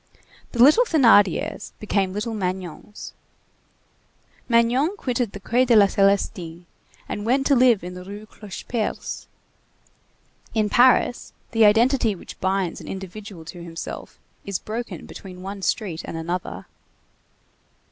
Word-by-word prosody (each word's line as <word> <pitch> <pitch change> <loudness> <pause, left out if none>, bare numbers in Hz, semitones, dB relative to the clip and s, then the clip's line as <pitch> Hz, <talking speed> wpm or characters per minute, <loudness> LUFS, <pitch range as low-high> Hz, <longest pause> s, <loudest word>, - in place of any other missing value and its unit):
The 240 -1 +5
little 310 - +7
Thénardiers 230 - +3
became 200 -3 0
little 210 +4 -3
Magnons. 185 0 -5 1.4
Magnon 245 - +3
quitted 245 - -1
the 200 - -7
Quai 235 +6 +2
des 240 -2 +4
Célestins 195 -4 +2 0.4
and 205 - -4
went 260 +5 +1
to 280 - +4
live 245 -6 +4
in 180 +1 -6
the 180 0 -8
Rue 205 +3 -9
Clocheperce. 215 +2 -5 1.3
In 215 -1 +2
Paris, 245 0 +3 0.2
the 225 -2 +5
identity 230 +1 +4
which - - -12
binds 190 -2 -1
an - - -11
individual 190 -2 -8
to 175 +2 -9
himself 165 -1 -7 0.3
is 200 -2 -2
broken 230 +2 -6
between 185 -2 -10
one 195 +1 -6
street 190 -5 -1
and 165 - -6
another. 165 - -4
205 Hz, 125 wpm, -23 LUFS, 185-235 Hz, 1.4 s, little